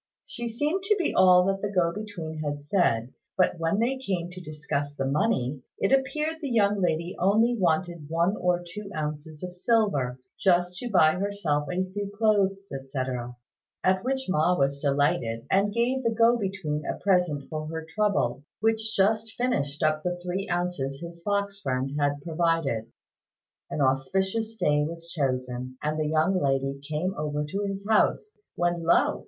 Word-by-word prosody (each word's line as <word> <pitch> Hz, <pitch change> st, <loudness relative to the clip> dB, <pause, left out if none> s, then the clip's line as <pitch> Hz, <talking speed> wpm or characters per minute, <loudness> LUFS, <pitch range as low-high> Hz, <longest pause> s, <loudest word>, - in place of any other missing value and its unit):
She 240 Hz, 0 st, -5 dB
seemed 295 Hz, -, -1 dB
to 420 Hz, +1 st, +4 dB
be 360 Hz, -, 0 dB
all 180 Hz, -1 st, +6 dB
that 195 Hz, 0 st, 0 dB
the 205 Hz, -, -1 dB
go 180 Hz, -4 st, +2 dB
between 175 Hz, -7 st, -6 dB
had 145 Hz, -1 st, -2 dB
said; 130 Hz, -, +1 dB, 0.2 s
but 185 Hz, -2 st, +2 dB
when 165 Hz, +4 st, +1 dB
they 250 Hz, +4 st, +1 dB
came 180 Hz, -8 st, -2 dB
to 185 Hz, 0 st, -8 dB
discuss 150 Hz, -2 st, -3 dB
the 135 Hz, -, -2 dB
money, 140 Hz, -, 0 dB, 0.2 s
it 195 Hz, -, 0 dB
appeared 300 Hz, +4 st, +1 dB
the 285 Hz, -, -3 dB
young 205 Hz, -4 st, +2 dB
lady 170 Hz, 0 st, 0 dB
only 220 Hz, +6 st, +3 dB
wanted 170 Hz, -5 st, 0 dB
one 170 Hz, +5 st, +2 dB
or 180 Hz, -2 st, 0 dB
two 195 Hz, +4 st, -8 dB
ounces 150 Hz, +1 st, -5 dB
of 180 Hz, 0 st, -5 dB
silver, 180 Hz, -, +1 dB, 0.2 s
just 180 Hz, -1 st, +3 dB
to 245 Hz, -, -4 dB
buy 180 Hz, -4 st, +4 dB
herself 180 Hz, -8 st, -1 dB
a 180 Hz, +1 st, 0 dB
few 205 Hz, 0 st, -3 dB
clothes, 200 Hz, -3 st, +2 dB
etc., 130 Hz, -3 st, -4 dB, 0.5 s
at 185 Hz, 0 st, +2 dB
which 265 Hz, +1 st, -1 dB
Ma 180 Hz, 0 st, +2 dB
was 140 Hz, +1 st, +1 dB
delighted, 140 Hz, -5 st, +1 dB
and 200 Hz, +2 st, +3 dB
gave 240 Hz, +4 st, +1 dB
the 230 Hz, -, +1 dB
go 230 Hz, +1 st, +4 dB
between 190 Hz, -8 st, -2 dB
a -, -, -3 dB
present 180 Hz, -7 st, +1 dB
for 155 Hz, 0 st, -4 dB
her 160 Hz, 0 st, -5 dB
trouble, 210 Hz, -8 st, 0 dB, 0.2 s
which 220 Hz, 0 st, +1 dB
just 220 Hz, +3 st, +2 dB
finished 150 Hz, -, -1 dB
up 155 Hz, 0 st, +2 dB
the 175 Hz, +1 st, -2 dB
three 180 Hz, +2 st, -3 dB
ounces 175 Hz, -6 st, -2 dB
his 170 Hz, 0 st, -9 dB
fox 200 Hz, +1 st, -1 dB
friend 130 Hz, -1 st, -1 dB
had 145 Hz, 0 st, +1 dB
provided. 165 Hz, -9 st, 0 dB, 0.8 s
An 150 Hz, -, -2 dB
auspicious 190 Hz, +12 st, 0 dB
day 150 Hz, -8 st, +2 dB
was 165 Hz, +2 st, -6 dB
chosen, 130 Hz, -3 st, -2 dB
and 155 Hz, +1 st, -1 dB
the 155 Hz, -, 0 dB
young 160 Hz, +5 st, +2 dB
lady 135 Hz, 0 st, 0 dB
came 160 Hz, +5 st, -1 dB
over 150 Hz, -3 st, -2 dB
to 200 Hz, +7 st, -3 dB
his 195 Hz, 0 st, -5 dB
house; 420 Hz, -, +2 dB, 0.2 s
when 175 Hz, 0 st, 0 dB
lo! 165 Hz, +1 st, +3 dB
175 Hz, 170 wpm, -27 LUFS, 150-205 Hz, 0.8 s, all